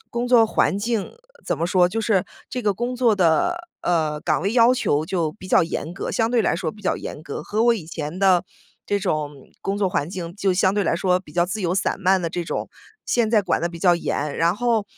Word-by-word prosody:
工 240 +1 -2
作 235 -3 +5
环 200 - +1
境 225 -1 -2 0.3
怎 - - -1
么 170 - -1
说， 180 0 +3
就 225 +5 -2
是 210 -4 +1 0.2
这 250 -1 -4
个 205 - +2
工 245 +4 -3
作 240 -4 +3
的， 200 - +1
呃， 155 -3 0
岗 - - 0
位 200 +3 0
要 240 0 +5
求 150 - 0
就 170 -4 -1
比 185 -2 -12
较 185 - +4
严 165 0 -4
格， - - -4
相 225 0 0
对 240 -2 +3
来 - - +1
说 170 -4 -3
比 210 - -16
较 185 - 0
严 150 - -7
格， 145 -3 -6
和 215 +2 -1
我 235 -1 +5
以 180 -8 -7
前 160 +1 -5
的 185 -2 +4 0.4
这 205 - +1
种 155 -5 -1 0.3
工 195 +1 -2
作 195 -2 +2
环 145 -4 -1
境 175 -1 -6
就 195 -2 +1
相 190 +1 +2
对 205 - +1
来 165 - +1
说 180 0 +1
比 150 -5 -16
较 175 0 +2
自 210 +3 -4
由 180 0 0
散 195 - -1
漫 190 0 +3
的 170 - -2
这 175 +1 -3
种， - - -4 0.4
现 235 -3 +1
在 220 -2 +4
管 - - 0
得 170 - 0
比 170 - -9
较 175 +1 +4
严。 150 -3 -2
然 170 +2 +2
后 230 -2 +1
185 Hz, 265 characters per minute, -22 LUFS, 170-220 Hz, 0.4 s, 作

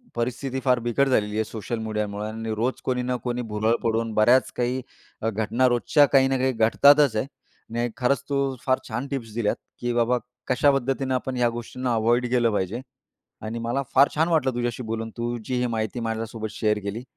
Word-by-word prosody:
परिस्थिती 125 +3 -2
फार 125 -1 +4
बिकट 120 +4 +1
झालेली 105 -5 +1
आहे 110 - +1
सोशल 115 +1 -5
मीडियामुळं 105 -1 -3
आणि 110 0 -5
रोज 120 +4 -1
कोणी 125 -1 0
ना 125 - 0
कोणी 125 0 -2
भुरळ 110 +2 +2
पडून 115 -1 0
बऱ्याच 120 +5 +4
काही 125 +1 -1 0.4
अ, 115 - +1
घटना 110 +4 +1
रोजच्या 145 +4 +4
काही 135 -1 +6
ना 135 0 +1
काही 130 +1 +1
घडतातच 135 +3 +5
आहे. 110 - 0 0.5
नाही 120 +1 0
खरंच, 130 +2 +1
तू 140 - +1 0.3
फार 130 -1 +3
छान 125 +4 -3
टिप्स 115 -6 -4
दिल्यात, 115 -3 +1 0.2
की 120 0 -1
बाबा 120 +1 +2 0.3
कशा 140 +3 +4
पद्धतीनं 135 0 -1
आपण 130 0 -2
ह्या 120 -1 +3
गोष्टींना 120 +1 -3
अव्हॉइड 120 +2 +2
केलं 120 -2 +2
पाहिजे 105 +5 -2 0.6
आणि 115 +2 -4
मला 120 +4 -1
फार 140 +2 +7
छान 160 +2 +2
वाटलं 140 -6 +2
तुझ्याशी 120 0 -2
बोलून 115 0 -4
तु 120 +1 -2
जी 130 - -2
ही 125 - +1
माहिती 110 +1 -2
माझ्यासोबत 115 -1 -3
शेअर 105 -1 0
केली 105 +4 -4
120 Hz, 190 wpm, -25 LUFS, 110-130 Hz, 0.6 s, फार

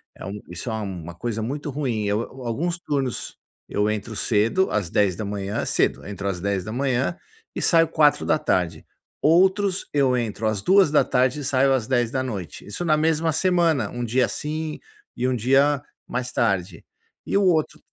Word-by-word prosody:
É - - -9
um 100 +2 -5
isso 90 +7 -6
é - - -2
uma 95 -6 -5
coisa 115 +4 -3
muito 145 +7 -4
ruim. 130 -6 -2
Eu 100 +2 +1 0.2
alguns 165 +10 -1
turnos, 140 -7 -3 0.3
eu 105 +1 +1
entro 105 +1 -3
cedo, 115 - +2
às 100 -6 -1
10h 100 +1 -1
cedo, - - 0
entro 100 -1 -5
às 95 -3 -2
10h 120 - -1 0.4
e - - -3
saio 165 -1 +4
16h, 90 - +1 0.4
outros 190 +4 +3
eu 135 -3 +3
entro 115 -2 -3
às 110 -2 -1
14h 150 - +3
e - - -6
saio 135 +1 +3
às 125 -4 0
22h. 120 - -2
Isso 105 +12 -5
na 155 -3 +3
mesma 160 +1 +1
semana, 165 - +2
1 120 0 -5
dia 120 +2 +2
assim 155 +3 -4 0.4
e 125 - -2
1 130 - 0
dia 135 +4 +3 0.3
mais 125 0 -3
tarde. 95 -6 -1 0.4
E - - +1
o 200 - +3
outro 160 -4 +1
125 Hz, 155 wpm, -23 LUFS, 105-150 Hz, 0.4 s, saio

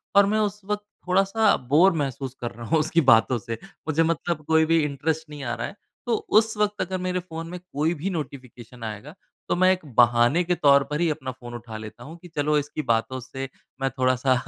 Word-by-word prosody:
और 200 - +7
मैं 215 - +2
उस 210 0 -1
वक्त 210 0 -2 0.2
थोड़ा-सा 195 +3 +3 0.2
बोर 180 +6 +7
महसूस 135 -1 -4
कर 120 - -3
रहा 115 0 -9
हूँ 160 - +3
उसकी 160 +2 +2
बातों 115 +2 +5
से। 115 0 -5 0.3
मुझे 160 +1 +2
मतलब 165 -1 -1
कोई 160 0 +4
भी 165 +1 +3
इंटरेस्ट 150 +2 -2
नहीं 145 -2 -8
आ 120 -1 -2
रहा - - -3
है। - - -10 0.3
तो 235 -2 +1 0.2
उस 220 0 +3
वक्त 210 -1 0
अगर 185 0 -2
मेरे 180 0 0
फ़ोन 165 -2 -7
में 180 0 -6
कोई 165 -2 -1
भी 195 - -1
नोटिफिकेशन 125 - -7
आएगा 110 +7 -6 0.4
तो - - +2
मैं 185 0 +6
एक 185 - +1 0.2
बहाने 120 +7 +5
के 180 +1 0
तौर 140 -2 +5
पर 150 - -1
ही 170 - +3
अपना 135 -4 -3
फ़ोन 120 -1 -11
उठा 115 -2 -7
लेता 110 +2 -9
हूँ 160 +6 -10
कि 180 - -11
चलो 150 +1 +2
इसकी 150 +1 -2
बातों 120 +1 0
से 135 +1 -7 0.3
मैं 135 - +1
थोड़ा 130 0 +3
सा 130 0 +2
150 Hz, 225 wpm, -25 LUFS, 130-175 Hz, 0.4 s, और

